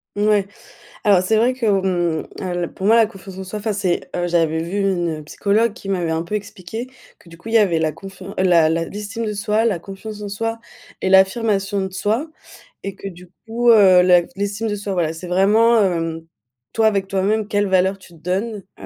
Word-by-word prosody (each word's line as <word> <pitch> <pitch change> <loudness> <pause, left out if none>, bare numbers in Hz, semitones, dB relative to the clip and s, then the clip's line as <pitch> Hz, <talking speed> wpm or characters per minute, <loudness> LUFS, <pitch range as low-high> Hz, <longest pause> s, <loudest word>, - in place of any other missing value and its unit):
Mouais, 205 -1 +2 0.6
alors 195 -3 +5
c'est 215 +4 +1
vrai 245 +3 +3
que, 255 -3 -4
on 180 -5 0
al 175 -2 -3
pour 190 - -5
moi 225 +3 +5
la 225 - +6
confiance 195 -2 -11
en 190 - -6
soi, 210 +3 -5
enfin 215 +1 -2
c'est 190 -4 -1
heu, 175 0 -1
j'avais 165 -2 +1
vu 190 +5 -2
une 175 -5 -1
psychologue 210 +8 +1
qui 195 - -12
m'avait 180 -4 -1
un 160 0 -1
peu 190 +5 -4
expliqué 205 +3 -6 0.3
que 170 - -19
du 165 - -13
coup 175 - -13
il 225 - -4
y - - +9
avait 185 -7 +3
la 155 -2 0
confian 195 +1 -10
la 175 -4 +4
la 165 +1 0
l'estime 210 +5 -5
de 215 - -2
soi, 210 +2 0
la 215 -7 +1
confiance 205 +3 -9
en 205 - -5
soi 225 +3 -3 0.4
et - - -1
l'affirmation 195 +1 +3
de 190 - -7
soi. 220 +11 -1 0.5
Et 195 -1 -4
que - - -8
du 180 0 -14 0.2
coup, 235 +2 +1
heu, 190 -5 +7
la 180 -1 +5
l'estime 205 +3 -2
de 205 - -1
soi 200 -1 -4
voilà, 165 -3 0
c'est 170 +2 -8
vraiment, 215 +5 +4
hem, 165 -3 -1 0.5
toi 220 -1 +3
avec 195 -2 0
toi 195 -1 -1
même 215 +1 +1
quelle 205 -1 0
valeur 190 +1 +2
tu 190 -2 -17
te 165 - -17
donnes, 195 +5 -3 0.2
heu, - - -8
195 Hz, 220 wpm, -20 LUFS, 180-210 Hz, 0.6 s, y